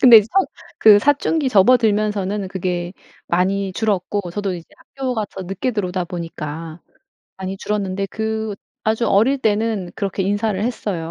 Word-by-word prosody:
근데 240 -3 +10
이제 210 - 0
사 390 - +4 0.4
그 210 -2 +8
사춘기 290 +2 +2
접어들면서는 210 -3 +3
그게 180 -2 -3 0.3
많이 190 +2 0
줄었고 200 -2 -1
저도 195 0 -2
이제 170 -2 -8
학교가서 230 -8 -4
늦게 195 +7 -2
들어오다 185 -4 -1
보니까 165 -1 -6 0.6
많이 190 0 -5
줄었는데 195 -2 -2
그 220 0 -3 0.3
아주 220 +2 +1
어릴 230 +8 +4
때는 215 -6 0
그렇게 195 -1 -2
인사를 205 +1 0
했어요. 195 -9 -3
205 Hz, 330 characters per minute, -20 LUFS, 185-220 Hz, 0.6 s, 근데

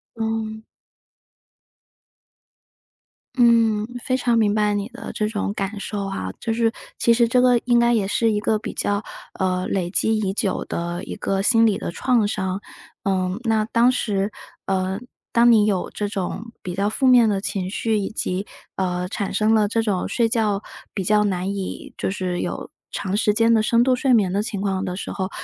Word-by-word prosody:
嗯。 220 -1 -3 2.7
嗯， 230 -4 +4 0.2
非 255 - 0
常 245 -2 +1
明 210 -2 +3
白 210 -1 +2
你 205 +1 -2
的 245 +1 -8
这 210 - -1
种 205 -2 -2
感 200 +1 -3
受 200 -1 -4
哈， 95 - -4
就 225 - -2
是 225 0 +2 0.3
其 235 - +4
实 235 0 +4
这 250 +1 +3
个 250 -1 +5
应 240 -1 +4
该 235 0 +4
也 215 -5 +2
是 225 +2 +2
一 210 - 0
个 215 0 +1
比 - - -6
较， 205 +1 -1 0.4
呃， 185 -1 0
累 180 -3 -1
积 220 +4 +1
已 195 -3 -1
久 195 -1 -1
的 175 +2 -4
一 - - -6
个 195 0 -1
心 225 +2 +4
理 215 -3 +2
的 - - -4
创 230 +3 +2
伤。 190 -1 -2 0.4
呃， 185 -2 0
那 220 -2 +1
当 235 +3 +3
时 205 -4 -1 0.4
呃， 190 +1 0 0.3
当 235 +1 +5
你 215 -3 +5
有 195 -4 0
这 205 - -3
种 205 +3 -4
比 180 -1 -5
较 200 +2 +1
负 265 +5 +1
面 245 -3 +7
的 200 -2 0
情 190 -2 -2
绪， 220 +1 0
以 200 0 -2
及， 190 -2 -2 0.3
呃， 180 -1 -1
产 200 0 -3
生 215 +2 +3
了 210 -1 +3
这 225 +2 0
种 205 -5 -1
睡 230 -2 +1
觉 215 -4 +1 0.3
比 195 - -2
较 210 +2 +3
难 195 0 -1
以 195 -1 -5
就 - - -1
是 185 -2 -2
有 - - -4 0.2
长 195 +1 -2
时 210 -1 +2
间 225 +1 +3
的 220 -2 +4
深 235 +2 +3
度 255 0 +3
睡 255 +1 +2
眠 205 -6 +3
的 200 +2 0
情 205 -3 -4
况 195 -1 -1
的 180 -1 -3
时 190 - -5
候， 190 -1 -3
210 Hz, 210 characters per minute, -22 LUFS, 195-225 Hz, 2.7 s, 面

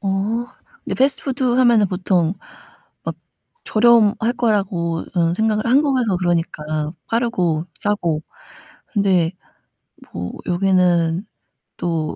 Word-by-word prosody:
어. 195 - -3 0.8
근데 - - -3
패스트푸드 270 0 0
하면은 240 -4 +4
보통 180 -2 0 0.7
막 - - -4 0.5
저렴할 225 0 +3
거라고 190 -7 0
음 170 0 +2
생각을 215 0 0
한국에서 255 -6 +2
그러니까 155 -3 -1 0.2
빠르고 185 -9 0
싸고 175 -7 -1 0.7
근데 190 -6 +2 0.8
뭐 90 +1 -5
여기는 180 -1 +2 0.5
또 165 -3 -2
190 Hz, 215 characters per minute, -20 LUFS, 170-230 Hz, 0.8 s, 하면은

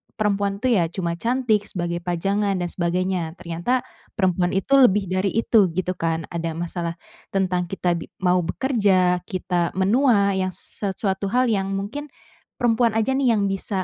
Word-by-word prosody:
perempuan 200 -1 -1
tuh 255 - +3
ya 180 -8 +3
cuma 170 0 -3
cantik 230 -3 +1
sebagai 175 -1 -3
pajangan 195 +4 0
dan 175 - -2
sebagainya, 175 -1 -1
ternyata 175 +10 -2 0.3
perempuan 180 -3 +1
itu 195 +8 0
lebih 205 -7 +4
dari 185 +1 +1
itu 225 -3 +4
gitu 185 0 -1
kan 165 -1 -1
ada 165 -1 -3
masalah, 170 0 -3 0.4
tentang 180 -2 0
kita 180 -1 -1
bi - - -8 0.2
mau 180 0 +4
bekerja, 190 -5 +2
kita 180 -3 -1
menua 200 +1 +3
yang 185 -1 -1
s - - -13
sesuatu 195 -1 -1
hal 250 0 +3
yang 195 -2 0
mungkin, 205 +10 -4 0.5
perempuan 235 -1 +2
aja 225 +3 +1
nih 265 -3 +2
yang 200 -2 +1
bisa 195 0 -2
190 Hz, 160 wpm, -23 LUFS, 175-215 Hz, 0.5 s, lebih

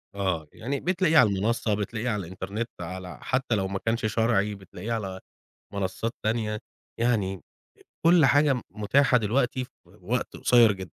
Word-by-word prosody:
آه، 90 -6 -1
يعني 135 +4 -3
بتلاقيه 175 -3 +2
على 110 -7 +7
المنصة، 105 +2 0
بتلاقيه 110 +4 -2
على 105 -4 -2
الإنترنت 95 +6 -5
على 90 +1 -6
حتى 130 -3 0
لو 95 -2 0
ما 95 0 -3
كانش 115 0 -1
شرعي 110 -2 +1
بتلاقيه 95 +3 -8
على 95 -4 -4 0.5
منصات 100 +3 -2
تانية. 110 -1 -1 0.4
يعني 100 -6 +1 0.7
كُل 170 -4 +7
حاجة 145 +1 +4
م 125 - -4
متاحة 125 +6 +3
دلوقتي 125 +3 0
في 130 - -18 0.2
وقت 105 +7 -4
قصير 120 -3 +5
جدًا. 95 - -9
110 Hz, 155 wpm, -26 LUFS, 95-125 Hz, 0.7 s, على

